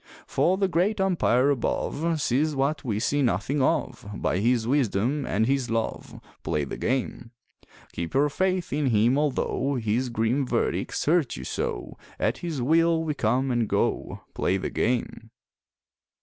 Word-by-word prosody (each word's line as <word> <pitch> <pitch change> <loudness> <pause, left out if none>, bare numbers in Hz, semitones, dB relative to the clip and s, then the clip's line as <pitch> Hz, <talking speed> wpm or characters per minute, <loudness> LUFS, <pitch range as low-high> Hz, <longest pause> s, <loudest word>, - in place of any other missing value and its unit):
For 185 +2 +1
the 195 0 +2
Great 185 +5 +1
Umpire 145 -8 +3
above 155 +4 -1
Sees 145 +3 +1
what 140 +2 0
we 105 -5 -1
see 145 +5 +1
nothing 125 +4 0
of, 145 +1 0
By 90 - -1
His 115 +1 +1
wisdom 130 +1 +1
and 110 +3 +1
His 135 0 0
love 115 0 -3 0.2
Play 75 - -1
the 70 - -5
game! 125 -2 -2 0.6
Keep 85 +7 -5
your 140 +2 +4
faith 185 +2 -1
in 145 -1 +1
Him 115 +2 +3
although 140 -1 0
His 120 +2 0
grim 115 +4 0
verdicts - - -1
hurt 155 -4 +2
you 65 - -7
so, - - -4 0.2
At 115 +4 0
His 160 -7 -3
Will 165 +3 +3
we 155 -2 -1
come 135 -2 0
and 120 -3 0
go - - -1
Play 95 - 0
the 95 - -4
game! 115 -2 -1
135 Hz, 155 wpm, -26 LUFS, 115-150 Hz, 0.6 s, your